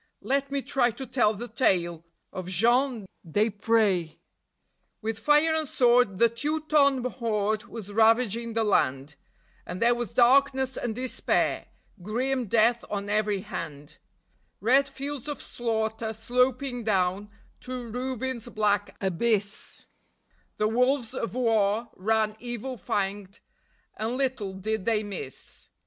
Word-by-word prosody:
Let 275 Hz, +1 st, 0 dB
me 280 Hz, -1 st, -2 dB
try 260 Hz, -3 st, +2 dB
to 245 Hz, +4 st, -7 dB
tell 245 Hz, -5 st, +2 dB
the 235 Hz, +4 st, -6 dB
tale 175 Hz, -8 st, +1 dB, 0.3 s
of 185 Hz, -1 st, -5 dB
Jean 235 Hz, +4 st, +2 dB, 0.2 s
Desprez. 205 Hz, -2 st, +1 dB, 0.8 s
With 220 Hz, 0 st, -3 dB
fire 295 Hz, +6 st, +4 dB
and 315 Hz, -1 st, 0 dB
sword 245 Hz, -6 st, +3 dB
the 235 Hz, -, +6 dB
Teuton 280 Hz, +1 st, +1 dB
horde 215 Hz, -4 st, -1 dB
was 215 Hz, -3 st, -9 dB
ravaging 230 Hz, +1 st, +3 dB
the 225 Hz, 0 st, +1 dB
land, 140 Hz, -8 st, +1 dB, 0.5 s
And 180 Hz, -, -6 dB
there 235 Hz, +1 st, +4 dB
was 240 Hz, -2 st, -4 dB
darkness 265 Hz, +1 st, +4 dB
and 225 Hz, -3 st, -3 dB
despair, 255 Hz, +1 st, -1 dB, 0.3 s
grim 245 Hz, +5 st, -1 dB
death 230 Hz, +3 st, +3 dB
on 205 Hz, 0 st, -3 dB
every 210 Hz, -2 st, +1 dB
hand; 150 Hz, -5 st, -7 dB, 0.6 s
Red 265 Hz, +7 st, +3 dB
fields 280 Hz, 0 st, -6 dB
of 295 Hz, -2 st, -4 dB
slaughter 220 Hz, -1 st, -2 dB
sloping 250 Hz, +2 st, 0 dB
down 195 Hz, -1 st, 0 dB, 0.3 s
to 250 Hz, -1 st, -6 dB
ruin's 250 Hz, 0 st, -4 dB
black 205 Hz, -2 st, 0 dB
abyss; 205 Hz, +2 st, -1 dB, 0.7 s
The 210 Hz, -, +2 dB
wolves 250 Hz, +2 st, +1 dB
of 235 Hz, -2 st, -4 dB
war 225 Hz, -2 st, +1 dB
ran 215 Hz, +2 st, +1 dB
evil 240 Hz, +1 st, -5 dB
fanged, 200 Hz, 0 st, -3 dB, 0.6 s
and 225 Hz, +4 st, -2 dB
little 255 Hz, -8 st, -2 dB
did 215 Hz, +1 st, -3 dB
they 220 Hz, -2 st, +1 dB
miss. 190 Hz, -10 st, -8 dB
230 Hz, 125 wpm, -27 LUFS, 205-255 Hz, 0.8 s, the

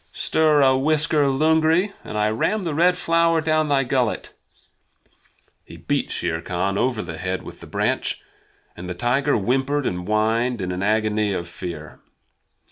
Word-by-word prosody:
Stir 155 Hz, -2 st, +2 dB
a 130 Hz, -1 st, +4 dB
whisker, 150 Hz, +2 st, +2 dB
Lungri, 160 Hz, +7 st, +2 dB
and 105 Hz, -, -6 dB
I 105 Hz, 0 st, +2 dB
ram 200 Hz, -, 0 dB
the 165 Hz, -3 st, -2 dB
Red 180 Hz, +4 st, +3 dB
Flower 165 Hz, -1 st, +2 dB
down 155 Hz, -1 st, +1 dB
thy 140 Hz, -1 st, +3 dB
gullet!" 125 Hz, -3 st, -1 dB, 1.3 s
He -, -, -13 dB
beat -, -, -2 dB
Shere 85 Hz, -1 st, -2 dB
Khan 95 Hz, +3 st, -2 dB
over 120 Hz, 0 st, 0 dB
the 80 Hz, -, -7 dB
head 95 Hz, +1 st, -3 dB
with -, -, -11 dB
the -, -, -12 dB
branch, -, -, -1 dB, 0.6 s
and 90 Hz, +1 st, -8 dB
the 90 Hz, -, -4 dB
tiger 135 Hz, +9 st, +1 dB
whimpered 135 Hz, +6 st, 0 dB
and 90 Hz, 0 st, -3 dB
whined 110 Hz, +3 st, +1 dB
in 90 Hz, -1 st, -3 dB
an 90 Hz, +1 st, -4 dB
agony 105 Hz, 0 st, +1 dB
of 85 Hz, -2 st, -4 dB
fear. 85 Hz, -3 st, -8 dB
125 Hz, 160 wpm, -22 LUFS, 100-155 Hz, 1.3 s, a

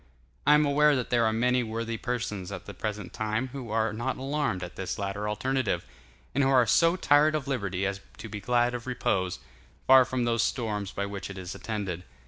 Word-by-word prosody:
I 150 Hz, -, +8 dB
am 150 Hz, 0 st, +4 dB
aware 145 Hz, +1 st, +4 dB
that 125 Hz, -3 st, -3 dB
there 120 Hz, -2 st, +4 dB
are -, -, +2 dB
many 125 Hz, +3 st, +2 dB
worthy 115 Hz, 0 st, -3 dB
persons 110 Hz, -6 st, -3 dB
at 95 Hz, -3 st, -7 dB
the 100 Hz, -, -8 dB
present 105 Hz, -2 st, -5 dB
time 110 Hz, +4 st, -1 dB
who 130 Hz, -3 st, -7 dB
are 110 Hz, 0 st, +1 dB
not 120 Hz, +4 st, -2 dB
alarmed 135 Hz, -8 st, -1 dB
at 90 Hz, -, -7 dB
this 95 Hz, -2 st, -4 dB
latter 100 Hz, +1 st, -3 dB
alternative, 105 Hz, -4 st, -1 dB, 0.5 s
and 140 Hz, -, +2 dB
who 135 Hz, -, +3 dB
are 130 Hz, -3 st, +5 dB
so 165 Hz, -, +4 dB
tired 155 Hz, -3 st, +4 dB
of 150 Hz, -2 st, -2 dB
liberty 100 Hz, -8 st, -1 dB
as 100 Hz, 0 st, -2 dB, 0.2 s
to -, -, -7 dB
be 105 Hz, -1 st, -6 dB
glad 120 Hz, +3 st, +2 dB
of 125 Hz, 0 st, -5 dB
repose, 95 Hz, -, 0 dB, 0.5 s
far 130 Hz, 0 st, +8 dB
from 125 Hz, 0 st, -2 dB
those 115 Hz, -1 st, +1 dB
storms 105 Hz, -5 st, -1 dB
by 100 Hz, -, -2 dB
which 100 Hz, -1 st, -6 dB
it 100 Hz, -, -8 dB
is 95 Hz, -1 st, -6 dB
attended. 100 Hz, -6 st, -4 dB
115 Hz, 210 wpm, -28 LUFS, 100-130 Hz, 0.5 s, I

